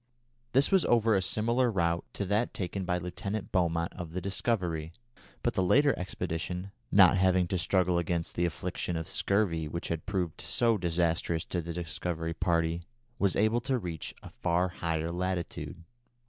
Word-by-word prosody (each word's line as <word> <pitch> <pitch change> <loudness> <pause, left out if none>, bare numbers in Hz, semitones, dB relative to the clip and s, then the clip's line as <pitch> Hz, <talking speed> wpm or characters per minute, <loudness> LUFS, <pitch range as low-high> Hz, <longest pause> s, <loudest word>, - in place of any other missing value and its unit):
This 135 +7 +5
was 190 -4 +5
over 115 -2 +4
a 95 - +3
similar 115 +6 +2
route 85 -5 0
to 100 - -2
that 105 +5 0
taken 95 0 -3
by 90 -1 +1
Lieutenant 95 +4 -4
Beaumont 85 -2 +1
of 85 -3 -7
the 90 - -1
Discovery; 90 -5 -1 0.5
but - - +1
the - - +1
later 140 +10 +4
expedition, 90 +1 -4 0.2
not 95 -2 +7
having 95 -1 +3
to 95 - 0
struggle 90 0 +2
against 85 -1 -2
the 85 - +2
affliction 85 0 -3
of 80 -1 -4
scurvy 90 -6 +1
which 85 +3 -4
had 80 -2 -3
proved 90 -6 -2
so 115 -1 +2
disastrous 85 -2 0
to 90 - -2
the 85 +1 -5
Discovery 85 -1 -3
party, 85 -1 +1 0.4
was 100 -4 +2
able 110 +3 +2
to 130 +1 0
reach 85 - -5
a - - -10
far 90 +2 +1
higher 80 -1 -2
latitude. 90 -1 -3
90 Hz, 165 wpm, -30 LUFS, 85-100 Hz, 0.5 s, not